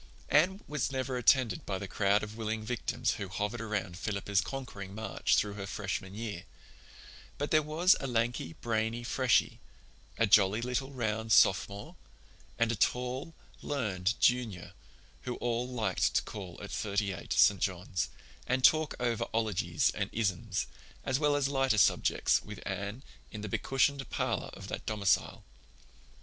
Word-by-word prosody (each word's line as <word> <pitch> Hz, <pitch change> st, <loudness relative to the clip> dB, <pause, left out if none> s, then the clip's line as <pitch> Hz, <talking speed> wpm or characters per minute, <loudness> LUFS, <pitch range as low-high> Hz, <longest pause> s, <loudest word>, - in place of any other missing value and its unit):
Anne 185 Hz, +7 st, +3 dB
was 150 Hz, -2 st, -1 dB
never 130 Hz, -1 st, -2 dB
attended 125 Hz, -3 st, +3 dB
by 95 Hz, -, -3 dB
the 100 Hz, +1 st, -6 dB
crowd 100 Hz, +2 st, +2 dB
of 105 Hz, 0 st, -6 dB
willing 110 Hz, -1 st, -3 dB
victims 115 Hz, -1 st, -1 dB
who 100 Hz, -, -5 dB
hovered 105 Hz, +5 st, -3 dB
around 105 Hz, -5 st, -3 dB
Philippa's 100 Hz, -1 st, 0 dB
conquering 100 Hz, -8 st, -7 dB
march 110 Hz, +1 st, 0 dB
through 105 Hz, -1 st, +1 dB
her 100 Hz, -1 st, -6 dB
Freshman 95 Hz, 0 st, -4 dB
year; 105 Hz, -5 st, -5 dB, 0.9 s
but 145 Hz, -, -3 dB
there 155 Hz, -, +5 dB
was 160 Hz, +5 st, +4 dB
a 135 Hz, -, -3 dB
lanky, 120 Hz, -8 st, -1 dB
brainy 115 Hz, +2 st, -2 dB
Freshie, 125 Hz, 0 st, +2 dB, 0.6 s
a 115 Hz, -, +4 dB
jolly, 100 Hz, 0 st, +5 dB
little, 125 Hz, +3 st, -2 dB
round 110 Hz, -4 st, -2 dB
Sophomore, 100 Hz, 0 st, +3 dB, 0.6 s
and 115 Hz, 0 st, +2 dB
a -, -, 0 dB
tall, 125 Hz, -, -1 dB, 0.3 s
learned 105 Hz, -7 st, -1 dB
Junior 120 Hz, -8 st, +1 dB, 0.5 s
who 125 Hz, -1 st, -4 dB
all 120 Hz, +1 st, -1 dB
liked 110 Hz, -7 st, 0 dB
to -, -, +3 dB
call 95 Hz, -5 st, -8 dB
at -, -, -7 dB
Thirty 100 Hz, -1 st, -1 dB
eight, 85 Hz, -, -9 dB
St. 100 Hz, -2 st, +5 dB
John's, 90 Hz, -1 st, -2 dB, 0.4 s
and 130 Hz, +1 st, 0 dB
talk 155 Hz, +1 st, +5 dB
over 120 Hz, -3 st, 0 dB
'ologies 95 Hz, -8 st, +1 dB
and 100 Hz, -1 st, -2 dB
'isms, 100 Hz, -6 st, -1 dB, 0.4 s
as 130 Hz, 0 st, 0 dB
well 150 Hz, -1 st, +3 dB
as 145 Hz, -2 st, +2 dB
lighter 135 Hz, -4 st, +1 dB
subjects, 95 Hz, -, +3 dB
with 105 Hz, -2 st, -9 dB
Anne, 100 Hz, +6 st, -4 dB, 0.3 s
in 105 Hz, -, -7 dB
the 105 Hz, -, -4 dB
becushioned 135 Hz, +4 st, +1 dB
parlor -, -, -1 dB
of -, -, -9 dB
that -, -, -6 dB
domicile. 105 Hz, -3 st, +1 dB
110 Hz, 155 wpm, -31 LUFS, 100-130 Hz, 0.9 s, there